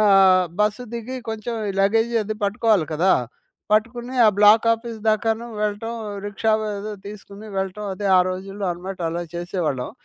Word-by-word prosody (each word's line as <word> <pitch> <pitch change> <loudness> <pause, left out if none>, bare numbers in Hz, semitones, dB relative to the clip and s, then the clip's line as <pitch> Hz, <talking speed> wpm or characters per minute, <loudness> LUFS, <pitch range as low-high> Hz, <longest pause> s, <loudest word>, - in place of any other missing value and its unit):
ఆహ్, 190 -3 +6
బస్సు 210 +4 +1
దిగి 235 +3 -5
కొంచెం 220 +2 -4 0.2
ఈ - - -3
లగేజీ 225 +3 +2
అది 215 +1 -3
పట్టుకోవాలి 205 -3 +2
కదా! 185 +4 +3 0.6
పట్టుకుని 240 +3 0
ఆ - - +7
బ్లాకాఫీస్ 225 +2 +4
దాకాను 225 +2 +1
వెళ్ళటం, 210 +2 -2 0.3
రిక్షావో 215 +2 0
ఏదో 210 +2 -5
తీసుకొని 205 +1 -10
వెళ్ళటం 195 +2 -3
అదే 200 +2 -4
ఆ - - +7
రోజుల్లో 195 +2 -5
అనమాట 185 +2 -7
అలా 170 +1 -3
చేసేవాళ్ళం. 170 -7 -2
210 Hz, 145 wpm, -22 LUFS, 190-225 Hz, 0.6 s, ఆ